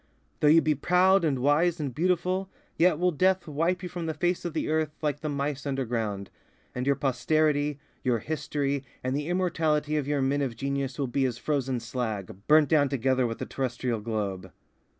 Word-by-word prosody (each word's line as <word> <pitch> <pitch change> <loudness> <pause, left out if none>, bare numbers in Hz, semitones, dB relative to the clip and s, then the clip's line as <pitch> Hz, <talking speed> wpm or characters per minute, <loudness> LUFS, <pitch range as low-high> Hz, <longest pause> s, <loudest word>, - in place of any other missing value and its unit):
Though 150 - +3
you 160 +2 +6
be 155 - +3
proud 180 +5 +3
and 145 -5 +1
wise 155 +6 +2
and 140 -4 -3
beautiful, 180 +4 0 0.3
yet 170 -2 +4
will 180 +2 +2
death 185 +3 +2
wipe 165 +5 0
you 180 - -4
from 175 -1 -5
the 160 - -2
face 175 0 0
of 170 - -3
the 160 - -1
earth 155 -1 +1
like 145 -1 0
the 155 - -3
mice 145 0 -2
underground; 115 -7 -2 0.4
and 125 +2 -3
your 140 - +4
posterity, 145 +2 +1 0.3
your 125 -3 +2
history, 140 0 -2 0.2
and 130 +1 -1
the 145 +1 -2
immortality 160 -4 +1
of 145 -2 -2
your 145 -2 +1
men 140 +2 +1
of 130 -4 -2
genius 135 +1 -2
will 140 - 0
be 135 +2 0
as 120 -3 -2
frozen 135 -3 -1
slag, 110 -5 -4
burnt 155 -1 +5
down 145 -3 +4
together 130 -1 +1
with 115 - -4
the - - -4
terrestrial 125 -3 -2
globe. 100 -4 -3
145 Hz, 190 wpm, -27 LUFS, 130-160 Hz, 0.4 s, you